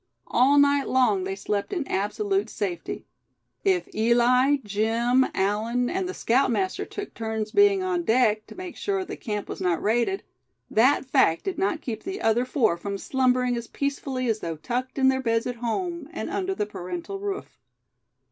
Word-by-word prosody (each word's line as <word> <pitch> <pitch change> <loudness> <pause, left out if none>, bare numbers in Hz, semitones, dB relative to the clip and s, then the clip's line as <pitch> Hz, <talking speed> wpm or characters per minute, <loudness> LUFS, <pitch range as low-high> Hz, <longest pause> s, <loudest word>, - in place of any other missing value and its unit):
All 270 +4 +4
night 285 -1 +4
long 220 -8 +3
they 195 0 -3
slept 200 +1 -2
in 345 -8 -2
absolute 205 +1 -1
safety. 190 -6 -4 0.6
If 375 -3 +2
Eli, 240 +5 +4
Jim, 230 +5 +2
Allan 220 +5 0
and 370 0 -1
the 380 - -5
scoutmaster 265 +9 +1
took 410 -1 -7
turns 220 -1 -3
being 405 -2 +4
on 365 -2 0
deck, 220 -6 +2
to - - -12
make 365 -1 -7
sure 390 -2 -2
the - - -6
camp 210 -3 -4
was - - -6
not 180 -3 +1
raided, 240 - 0 0.5
that 260 +6 +4
fact 260 - +3
did 385 - -3
not 370 -4 0
keep 220 -3 -5
the 385 +1 -5
other 230 +3 +2
four 235 - +1
from 200 +3 -4
slumbering 250 +1 +1
as 235 -1 -5
peacefully 275 -2 -2
as 220 -2 +1
though 165 -4 -4
tucked 245 - -4
in 265 -1 +4
their 265 0 +3
beds 230 -2 +1
at 245 -1 -3
home, 315 +7 -3
and - - -5
under 385 0 -1
the 210 - -1
parental 335 - -6
roof. 400 0 -5
250 Hz, 175 wpm, -25 LUFS, 215-315 Hz, 0.6 s, All